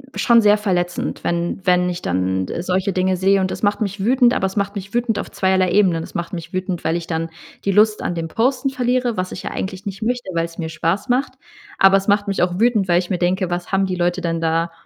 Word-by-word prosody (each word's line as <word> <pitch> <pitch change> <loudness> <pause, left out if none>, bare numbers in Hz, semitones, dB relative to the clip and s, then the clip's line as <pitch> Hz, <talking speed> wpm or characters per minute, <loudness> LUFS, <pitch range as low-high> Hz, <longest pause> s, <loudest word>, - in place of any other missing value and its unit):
schon 235 -2 +4
sehr 210 -1 +5
verletzend, 180 -4 -2
wenn 170 +2 -2
wenn 180 -1 +3
ich 175 -1 -4
dann, 95 +1 -1
äh, - - -4
solche 185 +2 0
Dinge 185 0 +1
sehe. 195 +2 +3
Und 185 -1 -1
es - - -6
macht 205 +1 +1
mich 200 -1 -2
wütend, 245 +2 +4
aber 190 - 0
es 190 - -8
macht 200 +1 -1
mich 200 0 -7
wütend 240 -2 0
auf - - -6
zweierlei 190 -1 +1
Ebenen. 180 -5 +3
Es - - -12
macht 170 +1 -4
mich 165 -1 -6
wütend, 185 -1 -3
weil 160 +1 0
ich 170 - -7
dann 165 0 -2 0.4
die 200 - +2
Lust 210 +2 +3
an 175 - -2
dem 165 -1 -3
Posten 255 - 0
verliere, 250 -2 0
was 185 0 -2
ich - - -7
ja - - -4
eigentlich 190 0 -5
nicht 200 +1 -6
möchte, 240 -2 -2
weil's 165 0 -2
mir 160 -2 -4
Spaß 165 +7 -1
macht. 255 +3 +1 0.4
Aber 195 0 +6
es 195 - -4
macht 205 0 +2
mich 195 - -1
auch 180 +1 0
wütend, 225 -4 +2
weil 175 -1 +4
ich 180 - -5
mir 180 - -1
denke, 185 +1 0
was 175 0 -4
haben 195 0 +2
die 185 -1 -2
Leute 175 +1 0
denn 165 -1 -2
da 165 +1 0
185 Hz, 255 wpm, -20 LUFS, 175-205 Hz, 0.4 s, Aber